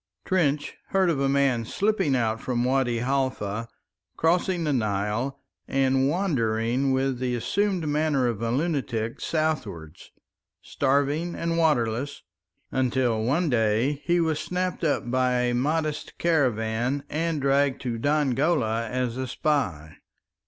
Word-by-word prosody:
Trench 150 -6 0
heard 190 -3 +2
of 145 - -1
a 135 0 +1
man 135 -4 +2
slipping 195 - +1
out 115 -2 0
from 120 -2 -1
Wadi 125 -2 +1
Halfa, 125 -5 -1 0.5
crossing 175 +1 +1
the 150 -2 +1
Nile 110 +4 -1 0.3
and 135 0 +2
wandering 130 - 0
with 130 -1 0
the 125 -1 -1
assumed 190 - 0
manner 150 -3 +1
of 115 -3 -2
a 115 - -1
lunatic 130 -5 -1
southwards, 110 - -3 0.5
starving 145 +5 0
and 165 0 -1
waterless, 140 -5 0 0.5
until 125 -3 +1
one 155 +9 +1
day 120 +3 +1
he 175 0 +2
was 160 -2 +1
snapped 180 0 -3
up 145 -6 0
by 130 0 +2
a 125 0 +1
Mahdist 150 +4 -1
caravan 125 -4 +1
and 160 +1 -1
dragged 140 0 +2
to 120 -3 -3
Dongola 135 -4 +1
as 125 -1 -2
a 130 0 -3
spy. 95 - -1
135 Hz, 130 wpm, -26 LUFS, 120-155 Hz, 0.5 s, heard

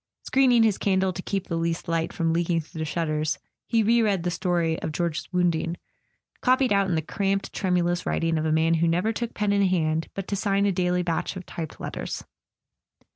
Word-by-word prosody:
Screening 255 -3 +4
his 215 -3 +2
candle 190 -1 +1
to 180 - -5
keep 195 0 -2
the 170 - -3
least 165 +2 -2
light 165 -1 0
from 165 -1 0
leaking 170 0 +1
through 160 0 -9
the 160 - -1
shutters, 155 -1 -1 0.3
he 225 -2 +2
re 235 +2 +4
read 200 -6 +1
the 175 - 0
story 170 -3 0
of - - -3
George's 170 +1 -2
wounding, 175 -2 +1 0.6
copied 255 -2 +3
out 200 -1 +3
in 175 - +1
the 160 - 0
cramped 195 +4 -1
tremu¬ 180 -3 +1
lous 175 +1 0
writing 165 -1 0
of 155 - -2
a - - +1
man 160 +1 +3
who 165 +1 +2
never 180 +7 +1
took 235 +1 -4
pen 205 -1 +1
in 200 -1 +3
hand 160 -3 0
but 195 -1 -4
to 200 - -1
sign 200 0 +1
a 200 - +3
daily 180 -1 +1
batch 170 +2 -2
of 185 -1 -7
typed 160 -2 -7
letters. - - -5
180 Hz, 215 wpm, -25 LUFS, 165-200 Hz, 0.6 s, Screening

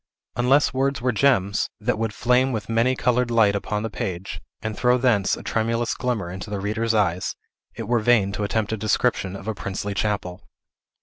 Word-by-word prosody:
Unless 130 +5 +3
words 135 -1 0
were 125 +2 +1
gems, 105 -6 +2
that 110 - -1
would 115 -1 -1
flame 125 +5 +2
with 110 -3 -4
many 115 +3 +2
colored 125 -1 +1
light 110 -4 +4
upon 105 +1 -2
the 115 - -2
page, 95 -2 -5 0.2
and 110 -1 -3
throw 125 +2 +3
thence 120 -7 +2
a - - -10
tremulous 115 +1 0
glimmer 115 -8 -2
into 95 +3 -7
the 100 -1 -3
reader's 110 +3 -1
eyes, 95 -4 0 0.4
it 115 -3 -6
were 120 -1 +2
wain 105 -4 +3
to 105 - -3
attempt 105 +1 -1
a - - -1
description 105 -2 0
of 100 +1 -9
a 110 - 0
princely 100 0 -4
chapel. 100 -3 -2
110 Hz, 190 wpm, -23 LUFS, 100-120 Hz, 0.4 s, light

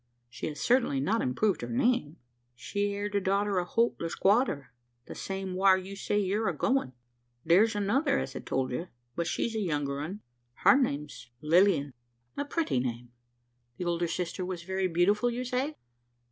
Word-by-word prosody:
"She - - -5
has 150 - -6
certainly 240 - +2
not 210 +12 +1
improved 185 +11 +1
her 120 - -5
name." 170 - +1 0.4
"She 200 - -2
are 205 0 -2
the 205 -1 -1
daughter 195 0 +1
o' - - 0
Holt 230 +6 +1
the 165 - -2
squatter 190 - +1 0.3
the - - -8
same 195 -1 -4
whar 190 0 +5
you 190 +1 -7
say 205 +1 -1
you're 205 +2 +1
a - - -4
goin'. 260 - +1 0.5
Thar's 210 +6 +5
another, 270 +8 +1
as - - -3
I - - -3
told 130 -1 -2
ye; 165 +9 -3 0.3
but 170 -1 -1
she's 230 - -1
a - - 0
younger 145 -7 -1
un. 185 +8 -5 0.4
Her - - +8
name's 150 - -2
Lilian." 160 -3 +3 0.4
"A 285 - -2
pretty 305 - 0
name. 120 -1 -4 0.7
The 180 - -4
older 170 0 0
sister 180 +2 -3
was 180 -2 -4
very 190 +1 -1
beautiful 195 +7 +2
you 240 +1 -3
say?" 260 +5 -1
190 Hz, 175 wpm, -29 LUFS, 155-215 Hz, 0.7 s, Her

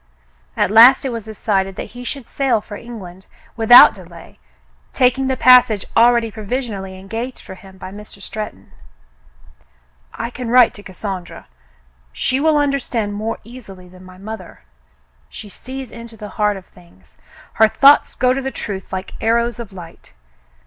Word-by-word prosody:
At - - +1
last 240 +5 +7
it - - -1
was 230 -3 -6
decided 195 -3 -2
that - - -7
he 245 0 -9
should 265 0 -6
sail 260 -4 0
for 205 0 -10
England 190 -5 -11 0.3
without 240 +2 +8
delay, 170 -4 -15 0.5
taking 260 +1 +2
the 260 -1 -1
passage 250 -5 +5
already 235 -1 +4
provisionally 210 -4 -5
engaged 225 +7 -6
for - - -11
him 190 0 -15
by 185 0 -9
Mr. 210 0 -12
Stretton. 200 - -8 1.4
"I 230 +1 -6
can 245 -1 -6
write 245 0 +5
to 205 - -12
Cassandra. 190 -2 -7 0.7
She 260 +1 -1
will 310 +1 +2
understand 265 -7 -1
more 220 +2 -4
easily 210 -6 -13
than 180 +1 -16
my 185 0 -14
mother. 200 -2 -10 0.7
She 210 - -11
sees 260 +4 -9
into 230 -1 -11
the 210 0 -9
heart 210 -2 -1
of 190 - -12
things. 170 - -23 0.4
Her 220 - +5
thoughts 280 +6 +4
go 250 +1 +2
to 270 - -3
the 265 - -3
truth 195 -7 -7
like 185 0 -6
arrows 235 +1 0
of 225 -4 -8
light. 170 - -13
220 Hz, 155 wpm, -18 LUFS, 195-245 Hz, 1.4 s, without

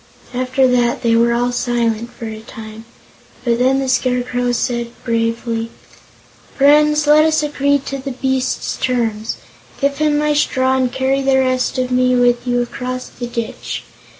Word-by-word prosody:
After 255 +1 +2
that 245 -1 +1
they 230 -1 +3
were 235 +1 +3
all 245 +1 +1
silent 235 -2 -1
for 230 - -9
a 220 -1 -6
time, 220 0 -10 0.6
but 235 -1 +1
then 260 +2 +3
the 270 - -2
Scarecrow 250 -1 0
said 240 0 -1 0.2
bravely: 230 0 -1 0.9
"Friends, 300 +2 +4
let 300 +1 +6
us 315 -1 +2
agree 285 -1 +1
to 275 - -4
the 270 +1 -5
beast's 260 0 -1
terms. 230 -3 -1 0.4
Give 280 0 +1
him 300 0 +1
my 300 0 +1
straw, 260 -3 +1
and 255 -2 +1
carry 265 +1 0
the 270 0 +3
rest 255 0 +1
of 255 0 -1
me 255 0 +3
with 245 0 +2
you 245 0 +1
across 255 +1 -5
the 245 - -7
ditch. 235 -2 -5
250 Hz, 160 wpm, -18 LUFS, 235-270 Hz, 0.9 s, let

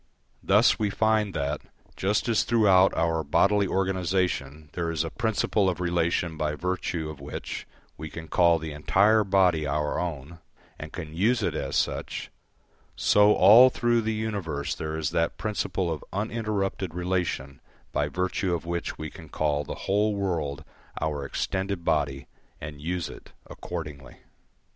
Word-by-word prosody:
Thus 105 +6 +4
we 105 -2 +1
find 110 -1 +1
that, 70 +1 -2 0.3
just 105 +5 0
as 115 -2 +3
throughout 100 -5 +4
our 80 -1 +1
bodily 100 +4 +3
organisation 90 -6 -1
there 85 -2 -2
is 80 -1 0
a 80 - -5
principle 110 -3 +1
of 90 -2 -3
relation 85 -1 0
by 75 -1 -1
virtue 90 -1 -2
of 75 - -11
which 70 - -6 0.3
we 80 0 -6
can 80 0 -8
call 85 -1 +4
the 80 -1 -6
entire 100 +8 +3
body 90 -6 +3
our 75 +1 -1
own, 80 -1 -5 0.4
and 75 0 -7
can 80 -2 -7
use 110 +6 +2
it - - 0
as - - -3
such, - - -2 0.6
so 105 +1 +5
all 110 +8 +8
through 120 -2 +1
the 110 0 -1
universe 100 -10 -3
there 80 0 -4
is 80 -2 -2
that 85 0 0
principle 95 -2 -2
of 75 - -7
uninterrupted 100 -4 -2
relation 90 -7 -2 0.3
by - - 0
virtue 90 0 -1
of 85 - -6
which 85 0 -3
we 80 -1 -6
can - - -12
call 75 -1 0
the - - -6
whole 105 +2 +2
world 85 -8 -2 0.4
our 75 -3 -2
extended 95 +2 -3
body 70 -3 0 0.3
and 75 -1 -8
use 85 +2 -2
it - - -12
accordingly. 75 -7 -7
90 Hz, 155 wpm, -26 LUFS, 80-100 Hz, 0.6 s, all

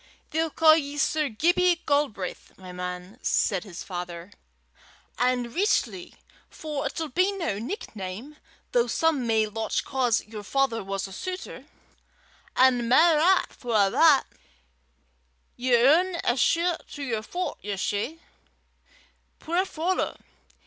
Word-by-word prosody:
"They'll 325 +1 0
ca' 315 +1 +6
ye 290 -2 -1
Sir 305 0 +1
Gibbie 345 +8 +2
Galbraith, 280 -11 -2
my 185 -1 -10
man," 180 +4 -7
said 190 -5 +1
his 185 -4 -8
father, 175 0 -7 0.9
"an' 245 -1 0
richtly, 370 - 0 0.3
for 300 -3 -4
it'll 315 +3 -4
be 365 +8 +2
no 335 - -3
nickname, 230 - -6 0.3
though 480 -1 +2
some 315 -7 +1
may 220 -1 +3
lauch 220 +1 -2
'cause 255 -4 +1
yer 215 -1 -8
father 250 0 0
was 195 0 -3
a 195 - -11
sutor, 370 - -6 0.9
an' 250 -2 +4
mair 315 +4 +5
'at, 365 +4 +3
for 240 -3 -4
a' 200 -2 +4
that, 305 0 +5 1.3
ye 255 +1 -3
haena 325 +9 +4
a 240 - +2
shee 340 +6 +2 0.2
to 290 - -6
yer 230 -5 -2
fut 355 +11 -4
yersel', 205 +8 -2 1.2
puir 345 +4 0
fallow! 365 +1 -2
265 Hz, 130 wpm, -26 LUFS, 215-325 Hz, 1.3 s, ca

